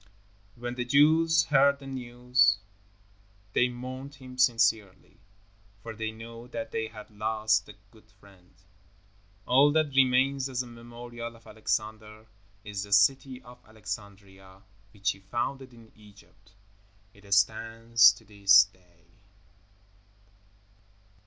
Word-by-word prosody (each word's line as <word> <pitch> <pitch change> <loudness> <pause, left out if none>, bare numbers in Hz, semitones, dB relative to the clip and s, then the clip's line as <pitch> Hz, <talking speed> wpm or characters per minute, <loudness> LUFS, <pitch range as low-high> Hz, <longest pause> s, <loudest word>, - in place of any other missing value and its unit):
When 120 0 -6
the 125 0 -3
Jews 160 +5 +4
heard 140 0 +3
the 140 - -14
news, 125 -3 +1 1.0
they 125 - +2
mourned 130 +3 -8
him 130 -2 -12
sincerely, 110 -6 +1 0.6
for 115 - -7
they 110 0 -4
knew 115 +2 -11
that 115 -2 -7
they 110 - -3
had 110 0 -13
lost 110 +1 -1
a 105 - -12 0.2
good 110 - -22
friend. 95 -3 -21 0.9
All 140 +4 +4
that 155 -3 +1
remains 135 +1 +2
as 130 -1 -2
a - - -13
memorial 120 0 -10
of 115 - -20
Alexander 110 0 -4 0.4
is 105 -2 -6
the 100 0 -4
city 130 +5 +2
of 125 0 -16
Alexandria, 100 -2 -10 0.3
which 100 0 -1
he 95 - -12
founded 120 +6 -4
in 115 -2 -18
Egypt. 100 -1 -21 0.6
It 100 0 -18
stands 115 +2 +4
to 110 +2 -18
this 100 -1 +6
day. 90 -4 -23
115 Hz, 120 wpm, -27 LUFS, 105-125 Hz, 1.0 s, this